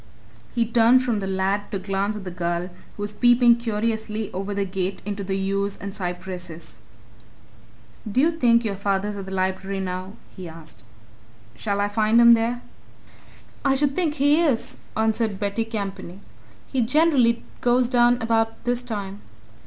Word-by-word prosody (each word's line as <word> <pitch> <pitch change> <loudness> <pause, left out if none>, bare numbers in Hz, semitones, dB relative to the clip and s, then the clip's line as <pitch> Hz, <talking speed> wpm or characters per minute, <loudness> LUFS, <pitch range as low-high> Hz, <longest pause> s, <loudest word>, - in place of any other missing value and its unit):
He 235 -1 +2
turned 235 +2 +4
from 235 -4 0
the 195 - -3
lad 195 +2 -1
to 200 - -1
glance 195 +2 -2
at 210 - -7
the 185 - -6
girl, 175 0 -2 0.3
who 205 - -4
was 205 0 -4
peeping 240 +1 +5
curiously 220 -1 -2
over 195 +2 -4
the 200 0 -1
gate 190 0 -3
into 205 -1 -4
the 195 0 -2
yews 195 +1 -1
and 200 -1 -7
cypresses. 180 -2 -6 1.3
"Do 245 - +1
you 320 +5 +4
think 240 -7 +3
your 210 - -1
father's 200 +1 -1
at 195 -1 -7
the - - -7
Library 190 +1 -2
just 190 - -2
now?" 185 +1 -5 0.2
he 185 -3 -8
asked. 160 -5 -11 0.7
"Shall 200 +6 -2
I 205 - +2
find 215 +2 +3
him 235 0 +8
there?" 235 +1 +2 1.0
"I 275 -1 +3
should 280 0 +1
think 325 -5 0
he 290 +3 +4
is," 280 -9 0 0.2
answered 220 -2 0
Betty 205 +2 -1
Campany. 195 -4 -5 0.5
"He 260 - -1
generally 255 -2 +3 0.2
goes 245 0 +3
down 240 -1 +4
about 225 0 0
this 245 0 0
time." 205 -4 -5
210 Hz, 165 wpm, -23 LUFS, 195-235 Hz, 1.3 s, him